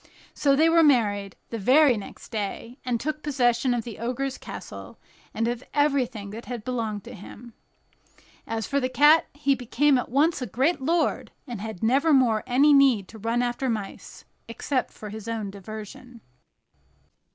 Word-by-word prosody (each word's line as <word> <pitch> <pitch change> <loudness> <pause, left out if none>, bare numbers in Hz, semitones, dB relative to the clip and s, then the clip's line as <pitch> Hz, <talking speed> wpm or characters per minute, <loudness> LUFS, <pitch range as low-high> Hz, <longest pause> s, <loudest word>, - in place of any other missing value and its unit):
So 280 -2 +2
they 315 +3 +4
were 330 0 +5
married 205 - +2 0.2
the 230 - -4
very 260 +5 +5
next 205 - -9
day, 230 +4 -5
and 245 -3 -1
took 305 +4 -3
possession 250 -4 +1
of 240 -2 0
the 230 -2 -9
Ogre's 255 +3 -3
castle, - - -9 0.3
and 225 - -1
of 240 +1 -3
everything 260 -8 0
that 225 +3 -8
had 240 -3 -6
belonged 220 -5 -3
to - - -10
him. 220 +4 -12 0.9
As 225 -1 -3
for 280 - 0
the 255 -1 -1
cat, 295 +5 +5
he 285 -1 +1
became 260 +2 +2
at - - -5
once 290 +5 +2
a 250 - -3
great 265 - 0
lord, 330 +5 0 0.2
and 235 -5 -6
had 220 -3 -7
nevermore 260 -3 +3
any 280 +4 +5
need 260 -9 +4
to 220 - -12
run 230 +3 0
after 245 +2 -2
mice, 215 -4 -6 0.2
except 255 +3 -2
for 210 - -10
his 215 +1 -8
own 220 -3 -3
diversion. 215 +4 -10
245 Hz, 165 wpm, -25 LUFS, 220-275 Hz, 0.9 s, were